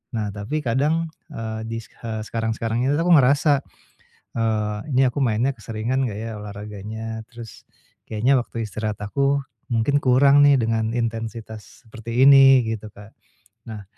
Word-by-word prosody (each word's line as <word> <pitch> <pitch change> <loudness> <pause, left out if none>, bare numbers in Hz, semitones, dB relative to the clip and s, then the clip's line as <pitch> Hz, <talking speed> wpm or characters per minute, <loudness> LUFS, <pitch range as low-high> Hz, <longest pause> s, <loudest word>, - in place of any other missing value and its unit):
Nah, 105 -2 -2
tapi 110 +10 -4
kadang, 150 +7 0 0.2
eee, 110 -1 -5
di, 115 0 -4
e 115 - -11
sekarang-sekarang 115 0 -2
ini 145 - +2
aku 170 +3 +1
ngerasa, 140 +2 +3 0.8
eee, 105 -2 -1
"Ini 130 0 +3
aku - - -3
mainnya 125 +3 +1
keseringan 115 +3 -3
enggak 105 - -6
ya, 115 +1 -5
olahraganya?" 105 +2 -7
Terus, 115 -2 -11 0.5
"Kayaknya 115 +6 +2
waktu 115 -1 -5
istirahat 105 0 -4
aku, 140 +7 0 0.3
mungkin 130 +5 +1
kurang 140 +3 +5
nih 140 -2 +6
dengan 115 -1 0
intensitas 115 -2 -5
seperti 115 +4 0
ini," 135 -3 +7
gitu 110 -1 -5
Kak. 105 +2 -15 0.5
Nah, 105 -2 -7
115 Hz, 140 wpm, -22 LUFS, 110-135 Hz, 0.8 s, ini